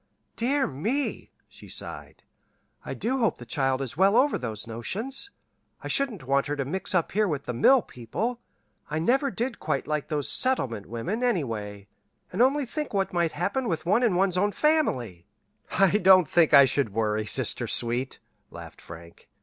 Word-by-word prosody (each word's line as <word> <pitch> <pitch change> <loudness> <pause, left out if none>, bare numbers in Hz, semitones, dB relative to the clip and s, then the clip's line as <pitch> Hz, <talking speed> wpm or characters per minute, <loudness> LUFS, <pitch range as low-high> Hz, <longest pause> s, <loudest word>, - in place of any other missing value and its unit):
"Dear 265 +4 +1
me!" 225 - -3 0.2
she - - -15
sighed. - - -7 0.6
"I - - -5
do 260 +4 -1
hope 225 -4 +1
the 120 - -11
child 135 +2 0
is 130 - -6
well 195 +6 +4
over 280 +3 +3
those 110 -3 -4
notions. 210 - -3 0.5
I - - -5
shouldn't 235 - -1
want 140 +2 +1
her 145 - -2
to 140 -2 -3
mix 190 +6 -3
up 170 - +1
here 210 +1 +2
with 145 -5 -2
the 125 - -3
mill 240 - +5
people. 220 - -4 0.5
I 150 - -2
never 265 - +2
did 240 -1 -3
quite 155 - -2
like 150 -1 -2
those 150 -3 -2
settlement 125 - 0
women, 120 - -3
anyway, 110 - -2 0.5
and 195 - 0
only 275 +3 +3
think 295 -1 -5
what 195 -1 0
might 170 -2 0
happen 235 +8 -1
with 165 -5 -2
one 205 +7 +3
in 230 -7 +2
one's 185 -1 +2
own 205 +1 +1
family!" 125 - 0 0.4
"I 195 -2 +3
don't 185 -3 +6
think 170 0 +3
I 140 - +9
should 135 -4 0
worry, 110 -1 0
sister - - -1
sweet," 120 +3 -2 0.3
laughed - - -11
Frank. 85 0 -13
170 Hz, 175 wpm, -26 LUFS, -, 0.6 s, I